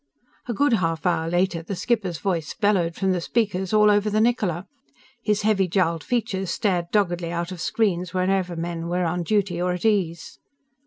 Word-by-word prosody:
A 240 - -1
good 285 +2 +3
half 165 -5 0
hour 165 -2 +1
later 175 -1 +1
the 190 +4 -5
skipper's 195 -3 -1
voice 170 -5 -2
bellowed 180 -5 +1
from 190 0 0
the 180 -2 0
speakers 190 -2 -1
all 210 -1 +5
over 205 +1 +2
the 215 +1 +1
Niccola. 210 -7 +1 0.6
His 210 -2 0
heavy 205 -3 +2
jowled 170 -3 0
features 195 -6 -1
stared 180 -3 0
doggedly 175 -5 0
out 170 +1 -3
of 180 -3 -7
screens 180 -6 0
wherever 185 -1 0
men 170 0 -4
were 180 +1 0
on 175 +2 -1
duty 180 -1 0
or 180 0 +1
at 180 +2 -5
ease. 180 -7 0
185 Hz, 180 wpm, -24 LUFS, 170-205 Hz, 0.6 s, all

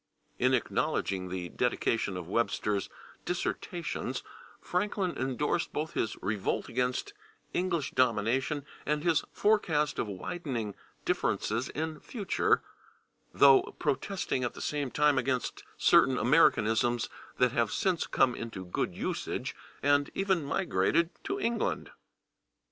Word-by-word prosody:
In - - +4
acknowledging 95 -1 -1
the 90 -1 -4
dedication 115 -4 0
of 90 -2 -6
Webster's 105 -1 0 0.3
"Dissertations" 175 0 -3 0.4
Franklin 200 -3 -1
endorsed 135 +5 -1
both 155 +2 -2
his 110 - -1
revolt 100 0 -1
against 125 - -1 0.4
English 175 -5 0
domination 130 +4 +1 0.2
and 150 0 0
his 165 -3 +3
forecast 165 -9 +2
of - - 0
widening 115 - -4 0.3
differences 120 +5 0
in 155 0 -3
future, 205 -7 0 0.7
though 135 - +5
protesting 165 -4 -1
at 120 - -2
the - - -8
same 145 -3 -1
time 145 0 +3
against 130 0 -2
certain - - +5
Americanisms 115 +2 +3 0.3
that 125 -1 +4
have 120 -1 +1
since 185 -3 0
come 125 - +3
into 115 -6 -6
good 90 - -2
usage, - - -3 0.3
and 145 0 +3
even 190 -4 +1
migrated 170 +2 +1
to 390 +1 -2
England. 235 - -1
135 Hz, 115 wpm, -30 LUFS, 115-170 Hz, 0.7 s, though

